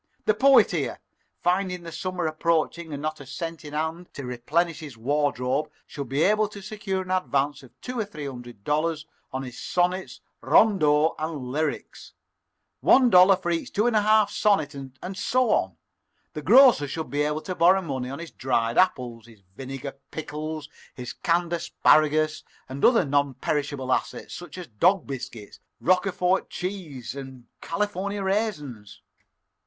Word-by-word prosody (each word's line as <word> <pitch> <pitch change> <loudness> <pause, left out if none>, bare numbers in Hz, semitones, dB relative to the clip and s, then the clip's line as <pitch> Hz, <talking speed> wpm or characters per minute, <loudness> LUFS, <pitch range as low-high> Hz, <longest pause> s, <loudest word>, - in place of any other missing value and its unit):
The 440 - +4
Poet 275 -4 +5
here, - - -2 0.4
finding 180 0 0
the 165 - -8
summer 185 +1 -3
approaching 160 +1 0
and 145 0 -5
not 155 0 -3
a 145 - -10
cent 165 +3 -6
in 150 -1 -9
hand 160 +3 -3
to 140 - -6
replenish 135 +8 -1
his 145 -6 -9
wardrobe, 135 +1 0 0.2
should 140 -4 -7
be 140 +4 +1
able 215 +1 +3
to 205 0 -10
secure 195 -2 -3
an 185 - -7
advance 145 -6 0
of 130 - -18
two 250 -1 -5
or 220 - 0
three 155 -8 -8
hundred 120 -6 -9
dollars 155 +2 0 0.3
on 130 +1 -3
his 125 -2 -8
sonnets, 180 -5 -1 0.2
rondeaux, 155 - +4
and 150 -5 -4
lyrics 155 +2 -3 0.7
one 255 -2 +5
dollar 185 +2 +8
for 175 -1 -3
each 165 - -2
two 210 - +2
and 240 -2 +2
a 210 - +5
half 215 0 +4
dollar 200 -7 +4
sonnet, 140 -2 -9
and 190 +1 -5
so 250 +4 +1
on. 95 -3 0 0.6
The 150 - -5
grocer 235 - +6
should 160 +3 -5
be 145 +1 0
able 150 +1 0
to 185 - -4
borrow 185 +2 +4
money 130 -5 -4
on 135 - -5
his 170 0 -8
dried 120 -3 0
apples, 120 -10 0
his 110 -4 -18
vinegar 135 +2 -7
pickles, 155 0 -5 0.3
his 125 -1 -6
canned 170 0 0
asparagus, 155 -2 +2 0.2
and 135 +2 -7
other 235 -7 +5
non 140 -1 +1
perishable 140 -1 -1
assets, - - -3
such 175 -1 -9
as 180 - -6
dog 170 - +2
biscuit, 120 -6 -8 0.2
Roquefort 185 0 +1
cheese, 170 - -5
and 130 -3 -9 0.2
California 200 +2 -2
raisins. 150 - -3
155 Hz, 165 wpm, -25 LUFS, 135-185 Hz, 0.7 s, dollar